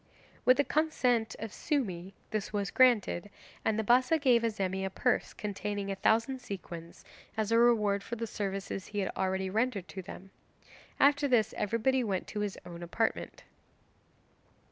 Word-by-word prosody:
With 255 0 +6
the 285 - +4
consent 250 -8 +1
of 225 -2 -6
Sumi, 195 - -2 0.2
this 215 -1 -2
was 200 -3 -2
granted, 220 -7 +3 0.3
and 220 -1 +1
the 220 - 0
Bassa 255 +8 +4
gave 255 -6 +4
Azemi 195 -4 -1
a 190 - -1
purse - - 0
containing 205 -1 -4
a - - -2
thousand 230 +6 +2
sequins, 170 -6 -8 0.3
as 220 0 0
a 230 - +5
reward 210 -4 +4
for 235 - -5
the 230 0 -3
services 195 -2 -4
he 205 - -7
had 195 -2 0
already 190 0 -1
rendered 220 -3 0
to 190 - -6
them. 190 +1 -10 0.7
After 285 +1 +4
this 225 -5 +3
everybody 230 +5 +1
went 195 -5 -1
to 210 - -4
his 205 -2 -2
own 175 -1 -9
apartment. 200 +6 -2
210 Hz, 160 wpm, -31 LUFS, 195-240 Hz, 0.7 s, With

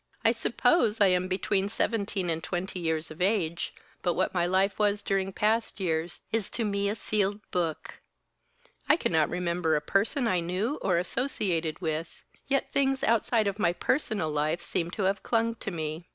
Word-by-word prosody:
"I - - +7
suppose 225 -11 +2
I 200 -2 +6
am 180 0 +2
between 195 +1 0
seventeen 200 -5 -1
and 165 0 -3
twenty 185 +1 -3
years 160 -2 -2
of 155 - -9
age, 180 -4 0 0.3
but 175 -2 +1
what 185 - 0
my 175 -1 +1
life 190 +3 +1
was 205 -1 +2
during 195 -1 0
past 220 +3 0
years 165 -2 -1
is 225 -3 -1
to 230 - 0
me 200 -1 0
a 210 - -1
sealed 205 -1 0
book. 170 -3 -3 0.9
I 300 - +7
cannot 160 - +2
remember 175 -2 0
a - - +3
person 205 - +1
I 185 -5 +2
knew 185 - -2
or 180 -3 +2
associated 180 - -1
with, 160 0 -3 0.2
yet 275 0 0
things 270 -1 +1
outside 225 0 +2
of 200 +1 -2
my 175 -3 +3
personal 205 - 0
life 155 +3 0
seem 170 -1 -1
to 195 +3 -3
have 195 +1 +1
clung 230 0 +1
to - - -4
me. 160 -1 -5
190 Hz, 180 wpm, -28 LUFS, 170-210 Hz, 0.9 s, I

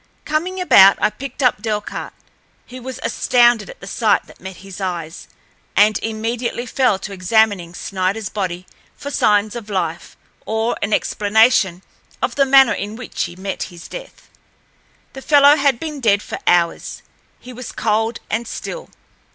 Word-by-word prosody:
Coming 345 +5 -2
about, 195 - +7
I - - +2
picked 275 +2 -6
up 245 -5 +2
Delcarte. 210 -1 -4 0.5
He 255 +1 -10
was 255 +1 -7
astounded 240 -4 +3
at - - -12
the - - -9
sight 215 +2 +1
that - - -18
met 190 0 -8
his 195 +1 -9
eyes, 170 -3 -5 0.5
and 210 0 +4
immediately 230 +2 -3
fell 250 -4 +1
to 195 +1 -7
examining 190 -2 +1
Sniderl's 195 +3 -2
body 185 -3 -4 0.3
for 285 - -7
signs 210 -3 +2
of 225 -3 -7
life 175 -4 -3 0.3
or 220 +2 -1
an 205 - -2
explanation 205 -4 +2 0.4
of - - -1
the 275 -1 +2
manner 270 -2 +6
in 205 +2 -5
which 250 +1 -4
he 170 - -9
met 190 +1 -5
his 170 -2 -12
death. - - -10 0.9
The 270 - -9
fellow 285 0 +6
had 275 -4 +1
been 305 -3 -5
dead 205 -5 +2
for - - -6
hours—he 175 +7 -2
was 250 0 -8
cold 225 +1 -1
and 225 +2 -2
still. - - -7
220 Hz, 155 wpm, -19 LUFS, 195-250 Hz, 0.9 s, about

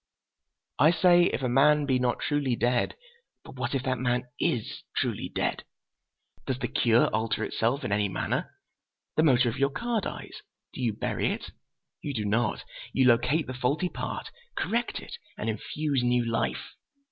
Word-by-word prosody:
"I 150 +4 +7
say 175 +1 +5
'if 135 - -1
a - - +2
man 145 +4 +4
be 130 -2 +2
not 125 -1 0
truly 145 -4 0
dead.' 120 +1 +1 0.5
But - - -11
what 125 +2 -2
if 130 - -1
that 130 -2 -1
man 125 0 +1 0.2
is 115 -4 -1 0.2
truly - - -1
dead? - - -1 0.8
Does 130 - 0
the - - -2
cure 115 0 +4
alter 110 +1 0
itself 125 +6 0
in 125 - -3
any 100 0 +2
manner? 95 - -2 0.6
The - - +4
motor 130 -5 +4
of 115 - -2
your 140 0 +3
car 235 - -1
dies—do 130 - -9
you 115 -3 +1
bury - - -1
it? - - -5 0.5
You 145 -2 -4
do 105 -2 -1
not; 110 +2 0 0.3
you 130 - +3
locate 125 +6 +3
the 130 - -5
faulty 140 +8 0
part, - - -5 0.2
correct 235 +1 -1
it, - - -9 0.2
and 110 - -1
infuse 140 +5 -2
new 120 0 +2
life. 115 -1 -2
130 Hz, 170 wpm, -28 LUFS, 120-145 Hz, 0.8 s, I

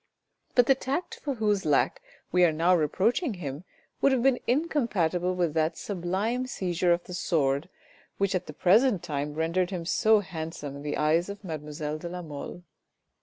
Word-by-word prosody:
But 245 - +6
the 270 - +6
tact 270 +6 -3
for 280 -3 -3
whose 210 -3 +1
lack - - +2 0.3
we 180 0 +4
are 170 - +5
now 170 +4 +3
reproaching 205 - +1
him 150 -1 -6 0.4
would 275 - +5
have 255 -3 +1
been 265 -2 +4
incompatible 210 - +1
with 175 -4 0
that 160 +1 0
sublime 205 +7 -2
seizure 180 -7 0
of 170 0 +2
the 180 - -9
sword, 145 -3 0 0.5
which 200 0 +1
at 185 - -2
the - - -6
present 200 - +3
time 150 -2 -3
rendered 170 +3 0
him 180 -4 -4
so 215 +4 +4
handsome 160 -5 -6
in - - -9
the 145 0 -3
eyes 160 +4 +2
of 200 0 -8
mademoiselle 150 -2 -5
de 170 - -6
la 180 0 -6
Mole. 155 +3 -7
180 Hz, 175 wpm, -27 LUFS, 160-215 Hz, 0.5 s, But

